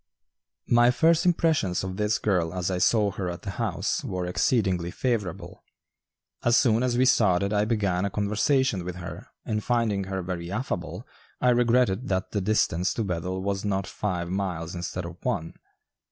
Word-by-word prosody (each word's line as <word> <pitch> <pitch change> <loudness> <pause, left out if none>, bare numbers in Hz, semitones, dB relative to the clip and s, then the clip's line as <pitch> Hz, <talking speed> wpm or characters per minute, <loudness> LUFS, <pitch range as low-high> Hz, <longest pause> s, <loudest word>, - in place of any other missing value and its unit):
My 120 0 +5
first 165 +8 +3
impressions 160 - +2
of 95 -1 -4
this 105 +1 +1
girl 90 -4 0
as 90 0 -1
I 90 - -1
saw 105 +2 +3
her 95 -1 -3
at 85 -1 -7
the 100 - -4
house - - -2
were 90 -1 -3
exceedingly 90 -2 +1
favorable. 105 -5 -3 0.8
As 120 0 +4
soon 115 -3 +3
as 125 -1 +1
we 130 - +4
started 100 -5 +3
I 105 0 +2
began 100 -5 0
a 100 - 0
conversation 105 +2 +1
with 90 0 -5
her 90 -1 -8 0.2
and 105 -1 -2
finding 115 -5 0
her 95 -1 -3
very 85 -1 -5
affable 100 -5 -4 0.3
I 125 - +4
regretted 120 -1 +2
that 95 -1 -1
the 105 - -1
distance 90 -3 +1
to 115 - -1
Bethel 90 0 -3
was 100 0 -2
not 100 -2 -1
five 90 -5 -3
miles 90 -4 -3
instead 85 -1 -4
of - - -10
one. 80 +1 -2
100 Hz, 170 wpm, -26 LUFS, 90-115 Hz, 0.8 s, My